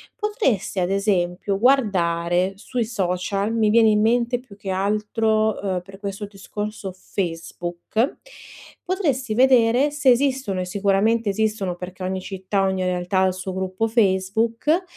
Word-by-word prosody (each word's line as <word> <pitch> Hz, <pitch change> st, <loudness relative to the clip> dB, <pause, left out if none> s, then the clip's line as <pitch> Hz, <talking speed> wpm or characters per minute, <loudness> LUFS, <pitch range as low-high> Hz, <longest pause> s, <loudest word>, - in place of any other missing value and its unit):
potresti 405 Hz, -, -1 dB
ad 175 Hz, 0 st, 0 dB
esempio 195 Hz, -1 st, 0 dB
guardare 185 Hz, -7 st, +2 dB
sui 235 Hz, +3 st, -3 dB
social, 195 Hz, 0 st, -1 dB
mi 220 Hz, -2 st, +2 dB
viene 225 Hz, 0 st, +5 dB
in 210 Hz, -1 st, +3 dB
mente 240 Hz, +2 st, +2 dB
più 245 Hz, -5 st, -15 dB
che 200 Hz, -1 st, -8 dB
altro, 215 Hz, +3 st, +1 dB
uhm, 185 Hz, -3 st, -1 dB
per 195 Hz, +1 st, -13 dB
questo 200 Hz, 0 st, -5 dB
discorso 205 Hz, 0 st, -6 dB
Facebook, 175 Hz, -, -3 dB, 0.6 s
potresti 285 Hz, -, -1 dB
vedere 250 Hz, +2 st, +4 dB
se 290 Hz, -2 st, +2 dB
esistono, 255 Hz, -7 st, +1 dB
e -, -, -3 dB
sicuramente 200 Hz, +4 st, +1 dB
esistono 205 Hz, -3 st, -1 dB
perché 185 Hz, +1 st, -8 dB
ogni 185 Hz, 0 st, -2 dB
città, 195 Hz, +1 st, -2 dB
ogni 190 Hz, -1 st, 0 dB
realtà 180 Hz, +1 st, 0 dB
ha 190 Hz, -, +4 dB
il 185 Hz, -, 0 dB
suo 185 Hz, 0 st, -5 dB
gruppo 190 Hz, +4 st, -1 dB
Facebook, 225 Hz, -, +1 dB
200 Hz, 140 wpm, -22 LUFS, 185-230 Hz, 0.6 s, viene